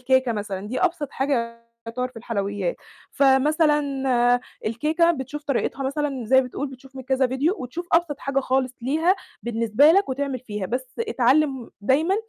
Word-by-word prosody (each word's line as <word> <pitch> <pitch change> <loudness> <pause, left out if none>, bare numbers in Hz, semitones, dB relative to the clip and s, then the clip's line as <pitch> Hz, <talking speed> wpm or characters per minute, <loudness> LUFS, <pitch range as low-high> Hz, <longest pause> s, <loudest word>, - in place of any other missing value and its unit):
كيكة 260 -1 +2
مثلًا، 205 -2 -4
دي 255 - -2
أبسط 340 -6 0
حاجة 235 -4 -2 0.2
يُعتبرّ 250 +2 -3
في 255 - -22
الحلويات. 200 -5 -2 0.3
فمثلًا 295 +3 +3 0.9
الكيكة 310 +10 +2
بتشوف 295 -1 -4
طريقتها 275 0 -1
مثلًا، 275 -2 -2
زي 260 +4 +5
ما 255 - -3
بتقول 275 +3 -4
بتشوف 265 0 -14
من 260 - -6
كذا 265 0 +1
فيديو، 275 +8 0
وتشوف 290 +8 -6
أبسط 330 -4 +2
حاجة 275 0 -1
خالص 260 -1 0
ليها 320 +9 +2 0.3
بالنسبة 230 +5 +4
لك، 390 -3 +3
وتعمل 270 0 -2
فيها، 210 -5 -5
بس 255 +5 -3
اتعلم 275 - +1
دايمًا 300 - +2
265 Hz, 155 wpm, -23 LUFS, 240-295 Hz, 0.9 s, زي